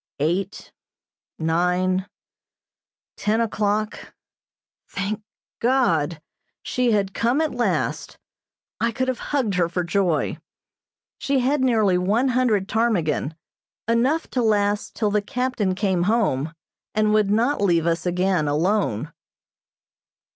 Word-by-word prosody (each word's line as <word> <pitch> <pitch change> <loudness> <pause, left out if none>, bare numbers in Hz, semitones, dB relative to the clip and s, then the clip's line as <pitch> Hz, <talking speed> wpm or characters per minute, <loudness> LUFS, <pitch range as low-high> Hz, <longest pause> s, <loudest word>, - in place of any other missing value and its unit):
Eight, 175 +7 -2 0.7
nine, 180 +3 +1 1.1
ten 215 +2 +1
o'clock 215 -1 -1 0.7
thank 200 +2 -3 0.4
God! 175 - +1 0.4
She 250 -1 0
had 200 -2 +1
come 240 +5 +1
at 315 -1 0
last. 245 0 -1 0.6
I 230 - +1
could 260 +3 -2
have 255 - -2
hugged 260 -8 0
her 175 -2 +1
for 180 +1 -1
joy. 175 -3 0 0.8
She 275 -1 +1
had 275 +3 +1
nearly 215 -8 +3
one 215 +8 +1
hundred 235 -6 +1
ptarmigan, 175 -10 0 0.5
enough 250 +8 +1
to 255 - 0
last 205 -2 +1
till 210 -2 0
the 210 0 +2
captain 225 -4 -1
came 190 -2 0
home, 165 - +1 0.4
and 215 0 +2
would 215 -2 +3
not 235 +7 +1
leave 170 -5 +2
us 170 +1 0
again 180 -3 +1
alone. 160 - 0
205 Hz, 115 wpm, -23 LUFS, 180-235 Hz, 1.1 s, nearly